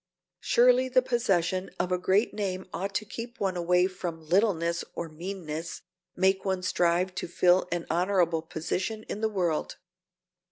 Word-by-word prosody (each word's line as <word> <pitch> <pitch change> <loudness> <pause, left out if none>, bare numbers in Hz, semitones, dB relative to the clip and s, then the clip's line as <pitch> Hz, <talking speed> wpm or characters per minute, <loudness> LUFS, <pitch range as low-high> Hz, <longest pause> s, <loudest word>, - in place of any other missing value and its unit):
Surely 250 +2 +4
the 255 0 +4
possession 190 -7 0
of 180 - -1
a 180 - +2
great 195 +5 +2
name 190 -3 -3
ought 195 +1 -4
to 210 - 0
keep 235 +4 -8
one 190 -2 0
away 180 +1 +3
from 175 -4 -5
littleness 170 -2 +2
or 170 - -4
meanness, 165 -1 -6 0.3
make 190 +1 +2
one 190 -2 -1
strive 180 0 +1
to - - -4
fill 180 +1 +3
an 170 -1 -2
honorable 175 -1 +1
position 180 +7 -3
in 210 - -6
the 220 - +1
world. 175 -7 -1
185 Hz, 155 wpm, -28 LUFS, 170-200 Hz, 0.3 s, Surely